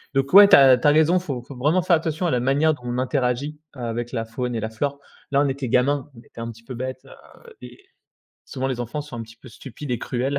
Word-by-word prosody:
Donc 135 Hz, 0 st, 0 dB
ouais 200 Hz, +1 st, +10 dB
tu -, -, +9 dB
as 135 Hz, -2 st, +7 dB
tu 135 Hz, -, +1 dB
as -, -, +7 dB
raison, 160 Hz, +4 st, +4 dB
faut 140 Hz, -9 st, -5 dB
faut 140 Hz, +1 st, -11 dB
vraiment 155 Hz, +8 st, +2 dB
faire 170 Hz, -, +4 dB
attention 160 Hz, +2 st, -2 dB
à -, -, 0 dB
la 125 Hz, -, +1 dB
manière 145 Hz, +5 st, +2 dB
dont 125 Hz, -, -20 dB
on 120 Hz, 0 st, -3 dB
interagit, 130 Hz, +3 st, -1 dB
avec 120 Hz, -2 st, -5 dB
la 115 Hz, -2 st, -2 dB
faune 120 Hz, +2 st, -4 dB
et 115 Hz, -, -1 dB
la 110 Hz, -, -3 dB
flore. 140 Hz, +5 st, -3 dB, 0.3 s
Là, 140 Hz, -, +3 dB
on 145 Hz, -, +1 dB
était 135 Hz, -1 st, -4 dB
gamins, 135 Hz, +3 st, +1 dB
on -, -, -13 dB
était 115 Hz, -, -12 dB
un 115 Hz, 0 st, -5 dB
petit 115 Hz, +1 st, -17 dB
peu 130 Hz, +2 st, -8 dB
bêtes, 130 Hz, +1 st, -6 dB
heu, 470 Hz, -1 st, -17 dB
et -, -, -12 dB, 0.7 s
souvent, 130 Hz, -2 st, -4 dB
les 125 Hz, -2 st, -3 dB
enfants 120 Hz, +5 st, -4 dB
sont 150 Hz, -3 st, -12 dB
un 115 Hz, -, -5 dB
petit 115 Hz, +1 st, -14 dB
peu 125 Hz, +2 st, -15 dB
stupides 135 Hz, +3 st, -10 dB
et 120 Hz, -, -1 dB
cruels 135 Hz, +3 st, -2 dB
130 Hz, 265 wpm, -22 LUFS, 120-145 Hz, 0.7 s, ouais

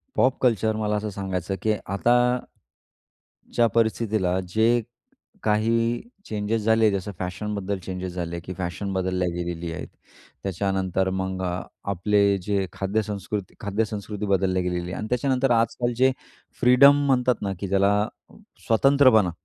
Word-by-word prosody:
Pop 130 Hz, +1 st, +3 dB
culture 110 Hz, -3 st, +2 dB
मला 105 Hz, -1 st, -1 dB
असं 105 Hz, +1 st, -2 dB
सांगायचं 95 Hz, -1 st, -3 dB
की 110 Hz, -1 st, +2 dB
आता 100 Hz, +5 st, +1 dB, 1.4 s
ज्या 120 Hz, -1 st, +4 dB
परिस्थितीला 110 Hz, -5 st, +1 dB
जे 115 Hz, +4 st, +3 dB, 0.6 s
काही 115 Hz, +2 st, +1 dB, 0.2 s
चेंजेस 105 Hz, +1 st, -2 dB
झाले. 110 Hz, 0 st, +4 dB
जसं 100 Hz, +1 st, -3 dB
फॅशनबद्दल 100 Hz, +1 st, -3 dB
चेंजेस 90 Hz, 0 st, -5 dB
झाले, 85 Hz, -1 st, -4 dB
की 90 Hz, -, -7 dB
फॅशन 95 Hz, +2 st, -3 dB
बदलल्या 90 Hz, -1 st, 0 dB
गेलेली 85 Hz, -1 st, -4 dB
आहेत. -, -, -6 dB, 0.5 s
त्याच्यानंतर 95 Hz, 0 st, -1 dB
मग 95 Hz, 0 st, -3 dB
आपले 100 Hz, +2 st, -1 dB, 0.2 s
जे 100 Hz, -1 st, 0 dB
खाद्यसंस्कृत 100 Hz, 0 st, -3 dB
खाद्यसंस्कृती 105 Hz, 0 st, -3 dB
बदलली 95 Hz, -1 st, +1 dB
गेलेली 90 Hz, -1 st, -2 dB
आहे -, -, -4 dB
आणि 110 Hz, -, -4 dB
त्याच्यानंतर 130 Hz, +1 st, +1 dB
आजकाल 120 Hz, +1 st, +1 dB
जे 130 Hz, +2 st, +4 dB, 0.5 s
फ्रीडम 140 Hz, +3 st, +6 dB
म्हणतात 125 Hz, -2 st, +3 dB
ना, 100 Hz, -1 st, -1 dB
की 100 Hz, -, -3 dB
ज्याला 100 Hz, +2 st, +2 dB, 0.6 s
स्वतंत्रपणा, 125 Hz, -4 st, +5 dB
105 Hz, 125 wpm, -24 LUFS, 95-115 Hz, 1.4 s, फ्रीडम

